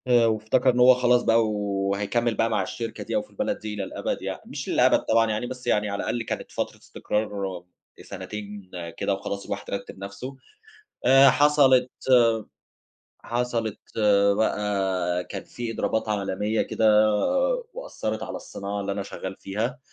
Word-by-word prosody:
آآ 120 -2 +5
وافتكر 110 +4 +2
إن 125 - -1
هو 125 +1 +8
خلاص 125 -1 +3
بقى، 115 0 +4
وهيكمّل 105 +3 -1
بقى 115 +2 +1
مع 105 -3 +1
الشركة 115 +3 -5
دي - - -4
أو 265 - +2
في 260 - -15
البلد 265 -1 -2
دي 105 -1 -5
للأبد 100 -2 -3
يعني، - - -5
مش - - -6
للأبد - - +4
طبعًا 115 -1 +2
يعني 110 +3 -2
بس 125 0 -8
يعني 105 0 +2
على 100 0 -3
الأقل 115 +1 -2
كانت - - -5
فترة - - -3
استقرار 100 -4 -3 0.4
سنتين 100 0 -8 0.3
كده 100 - 0
وخلاص 100 +1 -5
الواحد 100 0 -5
رتّب 100 - -5
نَفْسه، 125 +7 -7 0.7
آآ 135 +1 +8
حصَلِت 135 -3 +4 1.3
حصَلِت 120 -3 -2 0.6
بقى 95 -5 0
كان - - -7
في 120 -2 -5
إضرابات 110 0 -1
عالمية 105 +1 0
كده 110 -1 +4 0.6
وأثّرت 110 - -4
على - - -5
الصناعة 100 +1 -5
اللي 100 0 -2
أنا 100 0 -3
شغال 95 0 -7
فيها، 110 +7 -3
110 Hz, 150 wpm, -25 LUFS, 100-120 Hz, 1.3 s, هو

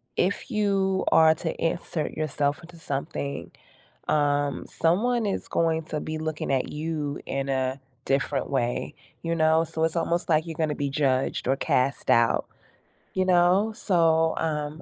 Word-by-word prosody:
if 195 +8 0
you 195 -4 +1
are 160 0 +6
to 160 0 -3
insert 165 -1 -2
yourself 145 -1 -1
into 170 0 -13
something, 140 -2 -4 0.6
um, 145 -1 +1
someone 225 +8 +1
is 200 - -2
going 165 -1 +1
to 155 -1 -4
be 155 +1 -4
looking 155 -2 -3
at 130 -1 0
you 150 -2 -3
in 135 0 -3
a 130 0 -1 0.2
different 135 0 0
way, 120 -3 -1 0.3
you 165 0 -1
know, 160 0 +3
so 160 0 -2
it's 160 +1 0
almost 170 +1 0
like 160 0 +2
you're 165 - -5
gonna 155 -2 0
be 140 -1 -2
judged 135 -3 0
or 135 - +3
cast 135 0 0
out. 115 0 +3 0.7
You 185 0 +2
know? 185 +4 +3
So, 165 -5 +2
um 150 0 -2
160 Hz, 155 wpm, -26 LUFS, 145-170 Hz, 0.7 s, are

